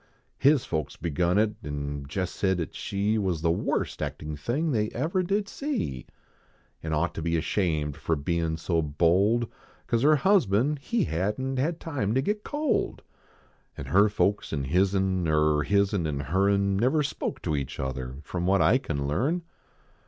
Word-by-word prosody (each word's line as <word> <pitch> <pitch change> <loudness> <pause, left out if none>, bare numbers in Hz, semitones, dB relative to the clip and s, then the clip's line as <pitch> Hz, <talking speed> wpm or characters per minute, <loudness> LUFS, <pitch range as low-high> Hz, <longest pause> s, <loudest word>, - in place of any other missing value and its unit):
His 140 -1 +4
folks 80 -4 -3
begun 85 +3 0
it 105 0 +2
an 70 -2 -5
jest 90 +4 -3
said 95 -2 +1
at 80 - -4
she 105 +2 -1
Was 90 -6 -1
the 85 - +3
worst 85 - -1
actin 75 0 -4
thing 135 - -1
they 105 -4 +1
ever 160 +9 0
did 200 +3 0
see; 240 - -3 0.7
An 80 - -4
ought 80 +3 0
to - - -5
be 85 +1 0
ashamed 80 -4 0
fer 80 +2 -1
bein 80 +2 -1
so 85 0 0
bold. 90 +10 +2 0.4
Cause 115 - 0
her 150 +3 +6
husband 145 - +3
he 220 +9 0
hadn 105 - -1
t - - +2
had 165 +3 -1
time 130 -9 -2
to 130 - +3
get 210 +5 -1
cold. 295 -1 -1 0.7
En 70 - -6
her 100 +10 +4
folks 105 0 0
an 70 -3 -1
hiz 90 +8 +2
n, 95 -2 +1
Er 75 -1 +3
hiz 100 +6 +2
n 85 -6 0
an 70 -2 -2
her 95 +7 +1
n, 100 -1 +2
Never 130 +8 +2
spoke 140 -1 -3
to 80 -4 0
each 70 -2 -4
other 65 -1 -4
From 90 +2 -3
what 95 +1 +4
I 130 - +4
can 70 - -3
learn. 140 - 0
95 Hz, 180 wpm, -27 LUFS, 80-130 Hz, 0.7 s, her